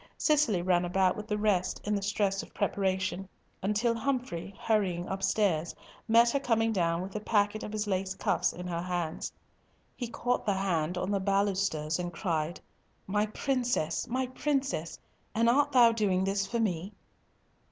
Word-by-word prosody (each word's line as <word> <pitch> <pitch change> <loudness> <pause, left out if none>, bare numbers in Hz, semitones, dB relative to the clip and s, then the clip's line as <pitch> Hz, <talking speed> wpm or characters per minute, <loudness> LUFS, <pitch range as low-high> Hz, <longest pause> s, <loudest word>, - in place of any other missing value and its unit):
Cicely 280 - +2
ran 180 -1 +3
about 185 +1 +2
with 210 0 -7
the 210 -2 -1
rest 195 -3 +1
in 210 - -1
the 200 - 0
stress 195 -1 0
of - - -14
preparation, 190 -2 -1 0.3
until 210 +4 +1
Humfrey, 230 -7 -3
hurrying 190 -6 0
upstairs, 190 -4 0 0.3
met 235 +1 +5
her 280 - +1
coming 225 -3 +1
down 170 -3 +1
with 190 +2 -8
a - - -1
packet 210 0 +1
of - - -6
his 215 0 -2
lace 190 -1 -1
cuffs - - +1
in 180 - -8
her 170 -1 -2
hands. 175 -3 -3 0.6
He 245 - -4
caught 245 +1 -1
the 200 -2 +1
hand 180 -3 0
on 185 +2 -2
the 200 - +1
balusters, 190 -5 0
and 175 0 -3
cried, 165 -3 -2 0.5
"My 210 +2 +1
princess, 245 - -1
my 260 +2 0
princess, 265 - -2 0.4
and 230 +1 +3
art 285 +4 +4
thou 240 -3 +7
doing 200 -5 +1
this 195 0 0
for 235 - -2
me?" 190 -3 -1
200 Hz, 165 wpm, -30 LUFS, 180-225 Hz, 0.6 s, thou